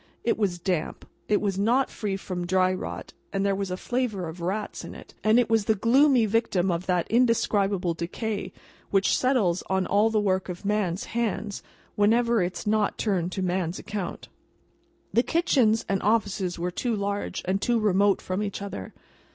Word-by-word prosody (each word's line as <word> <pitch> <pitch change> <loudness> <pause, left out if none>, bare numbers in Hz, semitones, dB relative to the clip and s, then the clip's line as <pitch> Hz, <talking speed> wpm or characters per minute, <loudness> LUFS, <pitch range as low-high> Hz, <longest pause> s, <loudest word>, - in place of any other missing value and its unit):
It 235 - +2
was 195 -5 0
damp, 175 -2 -3 0.2
it 210 - +3
was 195 -2 -1
not 240 +6 +2
free 200 -3 -3
from 180 -2 -5
dry 185 0 +3
rot, 185 - -6 0.2
there 195 0 +1
was 195 0 -2
a 180 - -3
flavour 220 -6 -2
of 165 +2 -8
rats 200 +5 -3
in - - -8
it, - - -13
and 215 +2 +4
it 245 - +2
was 225 -2 +2
the 220 - +3
gloomy 250 +3 +4
victim 195 -4 +1
of 170 +2 -3
that 180 -2 +1
indescribable 205 -6 +2
decay 200 +6 -4 0.4
which 195 -1 +3
settles 225 -10 +2
on 190 -1 +1
all 210 +2 +3
the 220 -1 +1
work 190 -2 0
of 180 +2 -7
man's 200 -3 0
hands 215 -3 -2 0.3
whenever 230 +2 +3
it's 180 +1 -3
not 210 0 +1
turned 185 -5 0
to 190 - -2
man's 180 -1 -1
account. 205 -3 -5 0.9
The 230 - +5
kitchens 255 -8 +2
and 195 -1 0
offices 200 -4 0
were 175 +1 -2
too 235 +5 -1
large, 200 0 -3
and 190 +2 0
too 240 -1 +2
remote 200 -1 +2
from 185 +2 -2
each 205 -2 -3
other. 195 - -7
200 Hz, 175 wpm, -26 LUFS, 185-220 Hz, 0.9 s, The